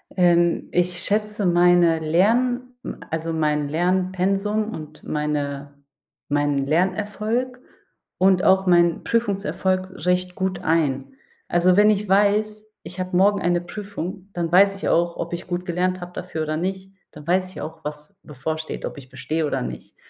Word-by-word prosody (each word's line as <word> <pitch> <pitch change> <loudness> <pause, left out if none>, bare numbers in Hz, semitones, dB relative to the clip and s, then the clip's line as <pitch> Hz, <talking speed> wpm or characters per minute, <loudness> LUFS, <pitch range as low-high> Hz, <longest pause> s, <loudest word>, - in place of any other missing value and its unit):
Ähm, 175 -2 +3
ich 175 0 0
schätze 210 0 -1
meine 175 -2 +4
Lern 245 +10 +1
hm, - - -6
also, 165 0 -3
mein 150 -2 0
Lernpensum 190 +5 0
und 155 -1 -9
meine 145 -1 -3 0.5
meinen 145 -1 +1
Lernerfolg 210 - -1 0.6
und 190 0 +4
auch 190 0 +4
meinen 175 -1 +4
Prüfungserfolg 195 -4 0 0.2
recht 180 0 +1
gut 190 -1 -2
ein. 150 - 0 0.3
Also, 180 +1 +3
wenn 210 +1 +6
ich 210 0 +1
weiß, 210 +2 +2 0.2
ich 180 +1 -9
habe 185 -1 -1
morgen 200 +2 +4
eine 175 0 +1
Prüfung, 195 0 -7
dann 170 -2 -2
weiß 195 +2 +5
ich 195 - -3
auch, 170 0 +1
ob 170 +1 -4
ich 175 +1 -5
gut 180 0 -3
gelernt 180 +1 -1
habe 175 0 -8
dafür 165 -3 -4
oder 155 0 -2
nicht. 190 +2 -4 0.2
Dann 150 0 -12
weiß 185 +1 +1
ich - - -9
auch, 160 +1 -8
was 150 +5 -8
bevorsteht, 155 +3 -5
ob - - -6
ich 130 -2 -12
bestehe 135 +5 -2
oder 145 - -1
nicht. 60 0 -8
180 Hz, 155 wpm, -23 LUFS, 160-195 Hz, 0.6 s, wenn